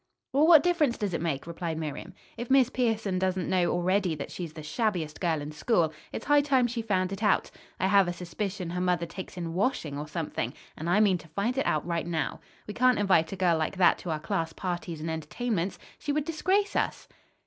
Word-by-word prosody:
"Well, 295 +4 +4
what 320 -4 +8
difference 330 -8 +2
does 205 -4 -2
it 165 - -1
make?" 155 -5 -2
replied 170 -1 -4
Miriam. 160 +3 -5 0.2
"If 240 - -6
Miss 265 -2 +5
Pierson 220 -6 0
doesn't 185 -1 0
know 180 -2 +2
already 180 0 +1
that 145 - -6
she's 170 -4 -6
the 155 - -8
shabbiest 165 -2 -1
girl 165 -4 +1
in 150 - -6
school, 165 -1 +1 0.2
it's - - -6
high 290 0 +5
time 270 -4 +3
she 240 0 -2
found 185 -4 0
it 195 - -6
out. 210 -3 +2 0.3
I - - +1
have 195 -1 +5
a 175 - -1
suspicion 180 +1 -4
her 180 +1 -2
mother 180 -2 +1
takes 185 +2 -8
in 170 -2 -4
washing 175 - -1
or 150 - -5
something, 160 0 -3 0.2
and 160 +2 -4
I 200 +5 +4
mean 190 -4 +3
to 160 - -14
find 200 +10 -1
it 270 - 0
out 155 -1 +1
right 170 -1 -2
now. 160 -4 -2 0.3
We 210 - -6
can't 255 +2 +4
invite 185 -6 +3
a - - -3
girl 175 -3 +2
like 160 +4 -2
that 180 -2 +5
to 175 - -6
our 155 -1 -1
class 165 -1 -2
parties 175 -3 -4
and 160 +1 -2
entertainments. 180 +4 -2 0.2
She 290 - -2
would 295 0 0
disgrace 380 +5 +1
us." - - -1
185 Hz, 225 wpm, -28 LUFS, 165-225 Hz, 0.3 s, what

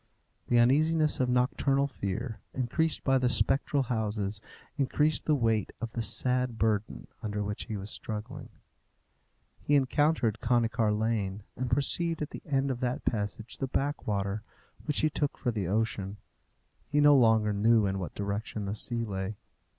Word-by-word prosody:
The 120 - +3
uneasiness 155 +6 +3
of 130 -1 +1
nocturnal 135 +2 +2
fear, 110 -2 -4 0.2
increased 145 +6 0
by 135 -1 +3
the 125 -1 +2
spectral 135 +2 +1
houses, 105 -4 -2 0.3
increased 145 +2 +1
the 155 - +4
weight 115 -6 0
of 115 -1 -4
the 120 - -3
sad 125 +1 +1
burden 105 - -1 0.2
under 105 -1 -2
which 105 0 -4
he 110 - -4
was 100 +2 -6
struggling. 105 -1 -6 1.1
He 145 - +2
entered 135 -4 +2
Conycar 115 -2 +2
Lane, 105 -2 -1
and 125 0 -3
perceived 155 +5 +2
at 150 - -6
the - - -8
end 135 -1 +1
of 125 - -4
that 125 +4 -2
passage 105 0 -3
the 135 - -1
Backwater, 105 -8 -2 0.4
which 150 - 0
he 155 - +3
took 145 0 -1
for 120 - -1
the 105 -6 -2
ocean. 100 -1 -1 0.7
He 145 0 +2
no 145 0 +7
longer 110 -4 +4
knew 110 +1 +4
in 95 0 -1
what 85 -5 -6
direction 100 +1 -3
the 100 - -2
sea 115 +2 -1
lay. 95 0 -4
115 Hz, 160 wpm, -29 LUFS, 105-135 Hz, 1.1 s, no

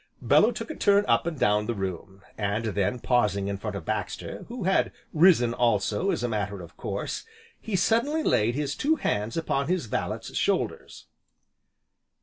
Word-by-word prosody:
Bellew - - +4
took - - -6
a - - -6
turn 200 0 +3
up - - +2
and 165 -3 -3
down 105 -2 +2
the 120 - -1
room, 95 0 -5
and 105 +2 -1
then 100 +1 0
pausing 105 -6 +1
in 100 0 -2
front 105 +1 -5
of 100 - -6
Baxter, 105 -3 -4
(who 235 -2 -6
had 190 +2 +2 0.2
risen 155 -8 +5
also, 115 - +1
as - - -1
a - - +1
matter 105 -3 -2
of 80 -2 -13
course), - - -4 0.4
he 220 - -3
suddenly 235 - +2
laid 115 - +2
his 145 -1 -1
two 310 +3 +2
hands 105 - -2
upon 140 -4 0
his 180 -5 0
valet's 110 - -4
shoulders. - - -1
115 Hz, 170 wpm, -26 LUFS, -, 0.4 s, risen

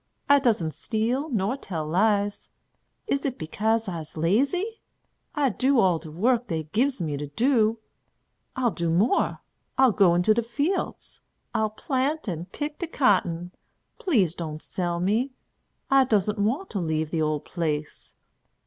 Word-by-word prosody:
I 285 0 +6
doesn't 215 - +1
steal 240 - -1
nor 215 -1 0
tell 165 - -4
lies. 205 +4 +1 0.6
Is 280 - -1
it 265 -3 -2
bekase 220 +7 0
I'se 165 -4 -6
lazy? 280 - +1 0.5
I 290 -3 +2
do 260 +3 +2
all 180 -6 +3
de 160 - -10
work 235 +9 +1
dey 160 -2 -2
gives 240 - 0
me 150 -3 -2
to 145 +1 -5
do. 225 - +2 0.8
I'll 250 -3 +1
do 170 -3 -2
more. 190 +9 +2 0.4
I'll 265 -2 +6
go 185 -4 +4
into 180 +5 +4
de 235 - +1
fields. 285 - -3 0.3
I'll 220 -1 +1
plant 265 +6 -1
and 175 0 -4
pick 295 0 -5
de 345 - -3
cotton. 180 - +1 0.5
Please 215 - +2
don't 155 -3 -6
sell 175 -2 -2
me. 220 +9 0 0.6
I 270 0 +7
doesn't 210 -2 +1
want 250 - 0
to 200 - -2
leave 160 -2 -1
de 165 - 0
ole 155 -1 +1
place. 150 -1 -4
210 Hz, 150 wpm, -26 LUFS, 170-260 Hz, 0.8 s, I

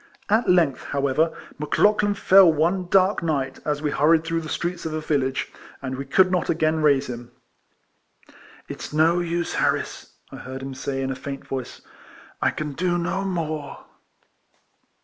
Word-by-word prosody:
At 220 +3 +2
length, 170 -7 +2
however, 140 +3 +1 0.3
Mc 150 - -2
Lauchlan 205 -1 +3
fell 195 -2 +6
one 170 +4 0
dark 190 +2 +3
night, 140 -5 -2
as 150 0 -2
we 150 - 0
hurried 160 +1 +3
through 165 0 -2
the 155 - -8
streets 175 +2 -3
of 160 -1 -3
a - - -1
village, 135 -4 -1 0.3
and 130 -1 -4
we 135 +1 -5
could 185 +7 +3
not 180 -1 0
again 160 0 +1
raise 140 -3 +3
him. 120 -1 -7 0.7
" - - -25
It's - - -7
no 160 +3 +3
use, 170 -1 -2
Harris," - - -2 0.2
I - - -8
heard 130 +1 -8
him 135 0 -6
say, 135 +1 -3
in 135 - -2
a - - -3
faint 135 +1 -7
voice, 130 -2 -6 0.3
" - - -22
I - - +3
can 150 -2 -4
do 175 +3 0
no 190 +3 -2
more." 155 -6 -4
155 Hz, 175 wpm, -23 LUFS, 140-175 Hz, 0.7 s, fell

